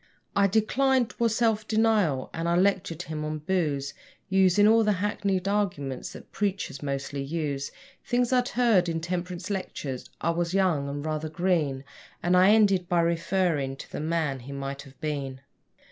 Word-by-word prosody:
I 200 Hz, 0 st, +5 dB
declined 245 Hz, +5 st, +2 dB
'TWAS 230 Hz, -2 st, 0 dB
self 220 Hz, -2 st, +1 dB
denial 215 Hz, -11 st, +2 dB
and 165 Hz, +1 st, -2 dB
I 170 Hz, -, +2 dB
lectured 180 Hz, -3 st, +1 dB
him 155 Hz, -2 st, -5 dB
on 155 Hz, 0 st, -3 dB
booze, 150 Hz, -4 st, -1 dB, 0.4 s
Using 190 Hz, +1 st, +5 dB
all 225 Hz, +1 st, +5 dB
the 210 Hz, -1 st, +3 dB
hackneyed 195 Hz, -1 st, -1 dB
arguments 175 Hz, -11 st, -2 dB
that -, -, -12 dB
preachers 195 Hz, -9 st, -2 dB
mostly 140 Hz, 0 st, -3 dB
use; 145 Hz, -1 st, -3 dB, 0.3 s
Things 245 Hz, 0 st, +1 dB
I'd 250 Hz, 0 st, +2 dB
heard 225 Hz, -8 st, +3 dB
in 165 Hz, 0 st, -1 dB
temperance 180 Hz, +2 st, -4 dB
lectures 145 Hz, -9 st, -4 dB
(I 165 Hz, -, +1 dB
was 170 Hz, +2 st, -1 dB
young 170 Hz, -8 st, +2 dB
and 145 Hz, +1 st, -5 dB
rather 155 Hz, 0 st, -2 dB
green), 155 Hz, -5 st, 0 dB, 0.4 s
And 175 Hz, +1 st, +3 dB
I 185 Hz, +2 st, +6 dB
ended 200 Hz, -4 st, +4 dB
by 175 Hz, -1 st, +3 dB
referring 165 Hz, -4 st, 0 dB
to -, -, -11 dB
the -, -, -4 dB
man 155 Hz, -3 st, -1 dB
he 130 Hz, +3 st, -10 dB
might 140 Hz, 0 st, -5 dB
have 135 Hz, -2 st, -16 dB
been. 140 Hz, -3 st, -3 dB
175 Hz, 165 wpm, -27 LUFS, 145-200 Hz, 0.4 s, I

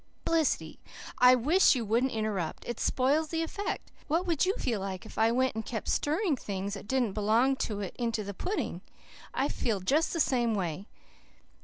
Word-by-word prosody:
"Felicity, 325 Hz, -3 st, 0 dB, 0.4 s
I 250 Hz, +1 st, +8 dB
WISH 295 Hz, +8 st, +4 dB
you 240 Hz, -3 st, -2 dB
wouldn't 235 Hz, +5 st, +1 dB
interrupt. 215 Hz, -7 st, -3 dB
It 240 Hz, -, -4 dB
spoils 285 Hz, +5 st, +2 dB
the 325 Hz, +1 st, -1 dB
effect. 400 Hz, +5 st, -4 dB, 0.2 s
What 335 Hz, +5 st, +1 dB
would 340 Hz, -1 st, +1 dB
you 385 Hz, -, +1 dB
feel 235 Hz, -6 st, -1 dB
like 190 Hz, +1 st, -5 dB
if 220 Hz, -, -8 dB
I 225 Hz, +1 st, +4 dB
went 260 Hz, +2 st, +1 dB
and 220 Hz, 0 st, -4 dB
kept 220 Hz, 0 st, -5 dB
stirring 315 Hz, +2 st, +1 dB
things 200 Hz, -4 st, -4 dB
that 200 Hz, 0 st, -7 dB
didn't 245 Hz, -4 st, +1 dB
belong 225 Hz, +6 st, +3 dB
to 205 Hz, -5 st, -2 dB
it 195 Hz, -, -5 dB
into 230 Hz, -3 st, -1 dB
that 200 Hz, 0 st, -6 dB
pudding? 385 Hz, -, -3 dB, 0.5 s
I 270 Hz, -, 0 dB
feel 225 Hz, -8 st, -1 dB
just 285 Hz, -, +1 dB
the 335 Hz, -, -2 dB
same 240 Hz, -6 st, +2 dB
way. 185 Hz, 0 st, -3 dB
240 Hz, 185 wpm, -29 LUFS, 210-290 Hz, 0.5 s, I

